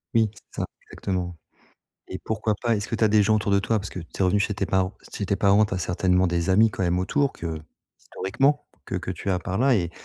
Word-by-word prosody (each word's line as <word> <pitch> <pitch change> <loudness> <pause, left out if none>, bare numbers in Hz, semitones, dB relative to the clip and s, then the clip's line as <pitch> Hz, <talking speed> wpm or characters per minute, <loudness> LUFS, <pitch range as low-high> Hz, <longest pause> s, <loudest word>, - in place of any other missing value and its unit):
Oui, 110 -1 +4
c'est 100 - -9
ça, - - 0 0.2
exactement 90 -2 -3 0.8
et - - -4
pourquoi 110 -1 0
pas 120 -2 +2
est-ce 100 -1 -3
que 115 - -2
tu 110 - +2
as - - +5
des 105 0 +5
gens 110 +2 +3
autour 105 -1 0
de 100 - +4
toi? 110 +2 +1
Parce 100 -1 -6
que 90 - -7
tu 85 - -10
es - - +4
revenue 95 +3 +3
chez 105 - +1
tes 100 -1 -2
parents 95 0 +1 0.2
chez 100 - -3
tes 100 - +1
parents, 100 +2 +5
tu 105 - -3
as - - -1
certainement 90 +1 +2
des 85 +1 0
amis 110 +4 +6
quand 95 - -4
même 90 0 +1
autour 135 +10 +1
que 80 -2 -5 0.4
historiquement, 135 +10 0 0.2
que - - -4
que - - -3
tu 100 - -4
as 90 - +1
par 90 +2 -3
là 130 0 +4
et 85 -4 -1
100 Hz, 265 wpm, -25 LUFS, 90-110 Hz, 0.8 s, amis